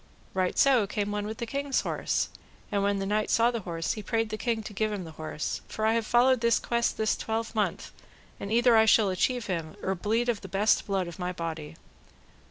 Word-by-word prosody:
Right 185 -1 0
so 255 -7 +4
came 205 0 -2
one 205 0 -2
with 220 +1 -5
the 235 - -3
king's 280 +3 -1
horse, - - -1 0.4
and 200 -1 +1
when 200 0 +1
the 195 - -2
knight 210 +2 0
saw 230 +1 +4
the 235 - -2
horse, 165 -4 -3
he 215 - -6
prayed 225 +1 -1
the 215 - -3
king 230 -3 -1
to 210 - -8
give 215 +1 0
him 200 -3 -3
the 165 - -9
horse: 155 -1 -4
for 215 - -3
I 220 - +4
have 230 -1 0
followed 250 0 +4
this 235 0 +4
quest 235 0 0
this 220 0 +1
twelvemonth, 220 -1 -2 0.5
and 200 - -5
either 240 +1 +5
I 220 0 +6
shall 215 -2 +5
achieve 240 +6 0
him, 165 -4 -3
or 190 - 0
bleed 220 +6 0
of 235 -4 0
the 195 - -8
best 200 +3 +2
blood 195 -3 0
of 170 - -9
my 180 0 -2
body. 165 -3 -5
215 Hz, 225 wpm, -28 LUFS, 190-230 Hz, 0.5 s, I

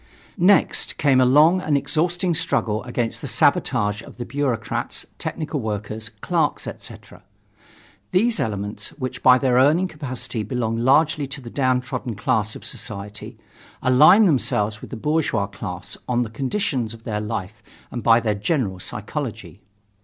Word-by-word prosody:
Next 190 +3 +3
came 135 -3 +4
a 125 - +5
long 155 +8 +5
and 150 -4 +1
exhausting 175 +5 0
struggle 120 -9 0
against 120 -2 -2
the 145 - -4
sabotage 115 -5 +2
of - - -14
the 120 - -5
bureaucrats, 130 -3 -2
technical 155 -2 -3
workers, 110 -1 -4
clerks, 165 -4 0
etc. - - -9 0.9
These 225 +5 +2
elements, 105 -1 -2
which 130 -3 -5
by 130 -1 +7
their 130 -2 +2
earning 155 +8 +4
capacity 130 -8 -4
belong 115 0 -2
largely 140 +4 +3
to 135 +2 -5
the 120 -3 -10
downtrodden 125 -2 -1
class 110 0 0
of - - -9
society, 105 0 -6 0.5
align 150 - +7
themselves 110 - +1
with - - -9
the 125 - -6
bourgeois 150 -6 0
class 95 -3 -7
by 125 - -4
the 120 -3 -1
conditions 130 - -2
of 115 - -17
their 105 -2 -3
life 105 -1 -5 0.3
and 120 - -4
by 115 0 +5
their 110 -3 0
general 105 - -1
psychology. - - -6
125 Hz, 145 wpm, -22 LUFS, 110-145 Hz, 0.9 s, by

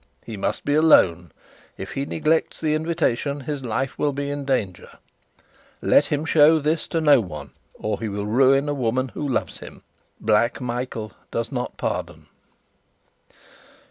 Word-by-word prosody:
He 115 - -6
must 100 - -3
be 145 - +1
alone. 90 - +4 0.5
If - - -7
he 140 +1 -3
neglects 160 +1 0
the 155 -2 0
invitation 155 -3 -1
his 140 0 -5
life 130 +3 -3
will 145 -1 +1
be 140 +1 -3
in 145 -1 -4
danger. 105 - -2 0.9
Let - - +4
him 150 +1 -2
show 160 0 +5
this 155 +2 -1
to 165 - -1
no 145 -4 +5
one, 75 - -8 0.2
or 105 -1 -3
he 115 - -3
will 100 0 -4
ruin 135 +5 +3
a 145 - 0
woman 130 0 -1
who 145 - -4
loves 130 - -2
him: - - -12 0.4
Black 115 +3 +2
Michael 120 -3 -4 0.2
does 115 +3 -3
not 125 -2 -4
pardon." - - -4
135 Hz, 155 wpm, -23 LUFS, 115-150 Hz, 0.9 s, show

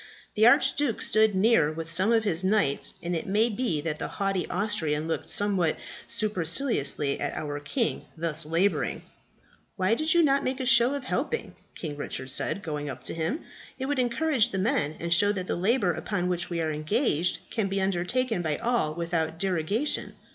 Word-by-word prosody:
The 220 +2 +5
Archduke 275 -1 +3
stood 215 -1 +3
near 190 -6 +4
with 165 +1 -6
some 190 +6 +1
of 225 -1 +3
his 185 -4 -1
knights: 190 -8 +1
and 175 0 -2
it 165 - -4
may 215 +4 +2
be 210 -9 -1
that 155 -1 -3
the - - -3
haughty 195 -2 -2
Austrian 160 -7 -1
looked 165 - -3
somewhat 195 -6 +2 0.3
superciliously 180 - 0
at - - -3
our 145 -1 -4
king, 220 - -2
thus 165 -1 0
labouring. 165 +6 0 0.7
"'Why 190 +2 +1
do 270 - -1
you 330 +2 +5
not 275 -2 +3
make 255 +1 -2
a 260 - -2
show 245 +2 +5
of 280 - -5
helping?' 470 - -2 0.2
King 150 -4 -5
Richard 130 -2 -4
said, 200 - -1
going 150 -2 -4
up 130 -2 -7
to - - -4
him. 165 - -2 0.4
'It 265 - -3
would 285 0 -1
encourage 250 0 +2
the 195 - -4
men, 190 - 0
and 170 0 0
show 205 +4 +4
that 185 -3 -4
the - - -2
labour 195 0 +2
upon 180 +2 -2
which 175 -1 -2
we 170 -1 -2
are 160 - -1
engaged 170 - 0
can 220 -4 0
be 195 0 -1
undertaken 195 +4 0
by 155 -3 -1
all 230 -11 0
without 165 -1 -2
derogation.' 195 - -1
190 Hz, 185 wpm, -27 LUFS, 160-235 Hz, 0.7 s, The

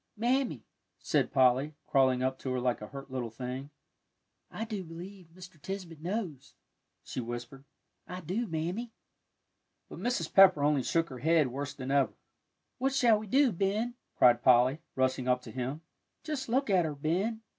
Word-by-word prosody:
"Mammy," 240 - 0 0.3
said - - 0
Polly, 130 +3 +3
crawling 130 -2 +3
up 130 0 -1
to 130 - -5
her 130 - 0
like 125 -2 0
a 105 - -6
hurt 135 +1 -10
little 125 -3 -3
thing, 125 +4 -6 0.8
"I 225 - -5
do 210 -4 -4
believe 175 +2 -10
Mr. 180 -1 -14
Tisbett 180 -3 -6
knows," 180 - -4 0.5
she - - -5
whispered. 120 +3 -7 0.4
"I 180 +1 -6
do, 195 +8 -2
Mammy." 180 +8 -3 1.0
But - - -9
Mrs. 220 -10 -2
Pepper 185 -7 +7
only 145 -2 +3
shook 165 +5 0
her 130 -2 -8
head 160 -2 +3
worse 140 +2 -5
than 135 -1 -5
ever. 140 -1 +2 0.7
"What 270 +1 0
shall 235 -5 +4
we 215 - -8
do, 265 +3 +4
Ben?" 205 +6 -1 0.2
cried 120 -1 +6
Polly, 125 +3 +5 0.2
rushing 130 -1 0
up 125 0 +2
to 115 - -9
him; 130 +6 -4 0.4
"just 290 -5 -4
look 260 -1 +1
at 185 -2 +4
her, 155 -2 -3
Ben. 190 +10 -1
160 Hz, 165 wpm, -30 LUFS, 130-200 Hz, 1.0 s, Pepper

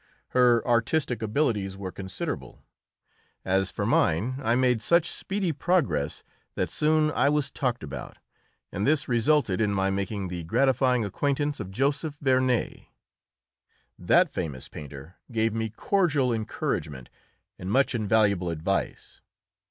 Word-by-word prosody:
Her 125 -2 +3
artistic 120 +2 +1
abilities 105 -5 0
were 95 -2 -5
considerable; 95 0 -6 0.8
as 95 0 +1
for - - -3
mine, 115 +12 +1
I 115 -1 +2
made 125 -3 +2
such 170 +3 +2
speedy 195 -3 -2
progress 135 - 0 0.3
that - - -1
I - - -13
soon 155 0 +2
was 145 -1 +1
talked 125 - -2
about, 70 -4 -7 0.5
and 100 +3 -2
this 150 0 +2
resulted 120 -4 +2
in 105 -2 +2
my 95 -1 +1
making 100 0 -3
the 90 -1 -5
gratifying 125 +5 +2
acquaintance 145 +7 -1
of 100 -4 -5
Joseph 140 - -1
Vernet. 130 -3 +1 1.1
That 165 - +3
famous 75 -9 -5
painter 75 +3 -10
gave 110 -1 +1
me 110 0 -2
cordial 145 - +1
encouragement 75 - -3 0.5
and 90 - -5
much 135 +6 +2
invaluable 105 -5 +2
advice. 85 +4 -3
115 Hz, 130 wpm, -26 LUFS, 95-140 Hz, 1.1 s, Her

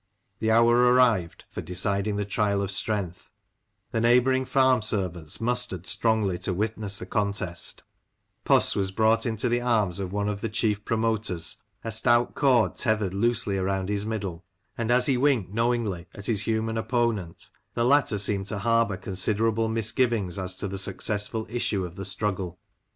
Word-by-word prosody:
The 110 - 0
hour 115 +1 +5
arrived 125 -7 +3
for - - -7
decid 100 +3 -1
ing 105 - -1
the 105 0 -2
trial 100 0 0
of 100 - -2
strength; 95 -1 -1 0.6
the 115 -2 0
neighbouring 125 +2 +3
farm 130 -3 +3
servants 90 -7 -2
mustered 120 -6 0
strongly 105 -6 +1
to 95 - -2
witness 105 0 -2
the 90 - -6
contest 100 -3 -2 0.6
Puss - - +3
was 95 -1 0
brought 110 +5 +2
in 115 - -1
the 120 +2 0
arms 110 -7 +1
of 95 -2 -4
one 100 +1 -1
of 105 -1 -3
the 115 - -2
chief 105 -1 0
promoters, 110 -7 -1 0.3
a 115 - -4
stout 120 +2 +2
cord 130 -6 +3
tethered 110 -5 0
loosely 105 -1 0
round 95 0 -1
his 105 -1 -1
middle; 100 -5 -4 0.3
and 115 -1 -3
as 125 +1 +3
he 135 -2 +2
winked 125 -8 +1
know 115 +2 +2
ingly 105 -8 -2
at 100 - -9
his 105 -3 0
human 110 0 -1
opponent, 110 -6 -2 0.2
the 120 - +1
latter 135 -5 +3
seemed 100 -1 0
to 105 - -3
harbour 115 -1 +1
considerable 110 +4 0
misgivings 110 -4 +1
as 95 0 -2
to - - -3
the 95 0 -4
successful 110 +3 -1
issue 110 -5 0
of 90 0 -9
the 95 0 -6
struggle. 95 -2 -2
105 Hz, 170 wpm, -26 LUFS, 95-115 Hz, 0.6 s, hour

